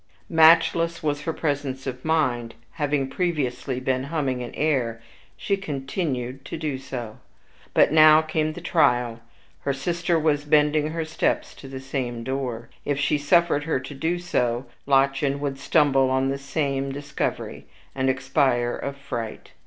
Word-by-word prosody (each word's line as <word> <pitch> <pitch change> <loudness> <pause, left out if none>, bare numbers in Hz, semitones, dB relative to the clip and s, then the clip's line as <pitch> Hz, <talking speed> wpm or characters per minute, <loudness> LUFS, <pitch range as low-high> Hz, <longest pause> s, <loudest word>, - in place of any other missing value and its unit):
Matchless 165 +1 +5
was 145 -1 -1
her 165 - 0
presence 145 -4 -2
of 125 -1 -5
mind; 125 -8 0 0.2
having 145 -3 -1
previously 135 -5 -2
been 130 0 -1
humming 140 -5 -1
an 120 - -5
air, 130 -7 0 0.4
she 200 - 0
continued 135 -6 -3
to - - -5
do 150 -4 -3
so. 120 -5 -7 0.6
But - - +5
now 155 0 +7
came 155 0 -1
the 175 - -8
trial; 125 -9 +2 0.4
her 140 - -1
sister 170 +5 0
was 150 -2 +1
bending 150 0 +3
her 160 +1 -3
steps 160 - -1
to 135 - -12
the 135 0 -7
same 125 -3 -4
closet. 130 -3 -3
If 145 -1 -1
she 145 +1 +1
suffered 150 -1 +3
her 160 -5 0
to 145 - -8
do 160 +5 -1
so, 125 -8 -1 0.2
Lottchen 140 0 +2
would 140 -1 -3
stumble 140 -2 +3
on 130 +1 +1
the 140 0 -2
same 140 -1 -2
discovery, 140 +1 -4 0.3
and 130 0 0
expire 130 -2 +1
of 140 0 -5
fright. 120 -6 -6
140 Hz, 155 wpm, -24 LUFS, 130-155 Hz, 0.6 s, now